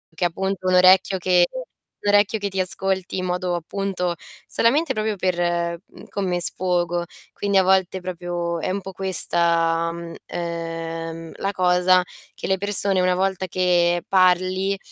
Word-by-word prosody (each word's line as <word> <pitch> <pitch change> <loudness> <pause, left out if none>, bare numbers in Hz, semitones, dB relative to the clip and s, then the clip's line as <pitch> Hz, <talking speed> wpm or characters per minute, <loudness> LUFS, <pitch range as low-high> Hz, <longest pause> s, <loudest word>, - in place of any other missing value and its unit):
che, 175 - 0
appunto, 190 +2 -3
un 185 - +3
orecchio 185 +1 +5
che 180 -1 +3 0.6
un 205 - +3
orecchio 205 +1 +3
che 200 -1 -3
ti 190 0 -4
ascolti 190 0 0
in - - -3
modo 180 0 -1
appunto 180 0 -3 0.3
solamente 280 +6 +1
proprio 215 -3 -1
per 175 -2 -1
mhmm, - - -15
come 180 -3 -2
sfogo. 175 -1 +1 0.3
Quindi 200 -1 -2
a 190 - +5
volte 190 0 +2
proprio 175 -1 -4
è - - -3
un 200 +1 -3
po' 195 - -8
questa, 170 -3 +1
mhmm, 170 0 -8
ehm, 165 -1 -5
la 195 - -2
cosa 180 0 +3 0.3
che - - -6
le 190 - +1
persone, 200 -1 +3
una 180 0 +2
volta 190 0 -1
che 175 -1 +1
parli, 185 +1 +2
185 Hz, 155 wpm, -22 LUFS, 175-190 Hz, 0.6 s, orecchio